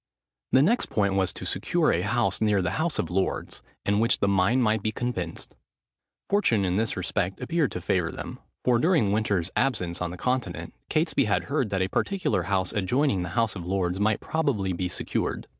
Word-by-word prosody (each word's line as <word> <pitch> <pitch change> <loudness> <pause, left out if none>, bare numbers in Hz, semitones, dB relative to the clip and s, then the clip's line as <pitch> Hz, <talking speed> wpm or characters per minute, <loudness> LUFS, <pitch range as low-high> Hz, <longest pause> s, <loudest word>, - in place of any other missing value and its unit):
The 130 - +5
next 235 +10 +2
point 100 -2 +1
was 95 -1 +1
to - - -7
secure - - +1
a - - +1
house - - 0
near 105 -3 +2
the 90 - 0
House 165 -1 +1
of 85 - -2
Lords, 95 +1 -2 0.2
in 100 +1 +2
which 115 +2 +3
the 100 - +2
mine 100 +6 +3
might 110 -3 +2
be 110 - -1
commenced. 105 -8 -4 0.7
Fortune, 120 - +2
in 90 -1 0
this 110 0 0
respect, 95 0 -2
appeared 165 -4 0
to 90 - -4
favour 85 -1 0
them, - - -7 0.3
for 120 -2 +4
during 160 - +3
Winter's 100 -4 0
absence 95 -10 0
on 90 - -1
the 90 - -7
Continent, 125 +5 -2 0.2
Catesby 155 -4 +2
had 105 -1 +1
heard 140 -6 -1
that 95 -1 0
a - - 0
particular 185 - 0
house 95 -2 0
adjoining 105 +2 +1
the 90 - -4
House 115 -3 +2
of 90 - -6
Lords 95 -1 -1
might 105 +1 +2
probably 125 - 0
be 90 +1 -2
secured. - - -2
105 Hz, 195 wpm, -26 LUFS, 95-125 Hz, 0.7 s, The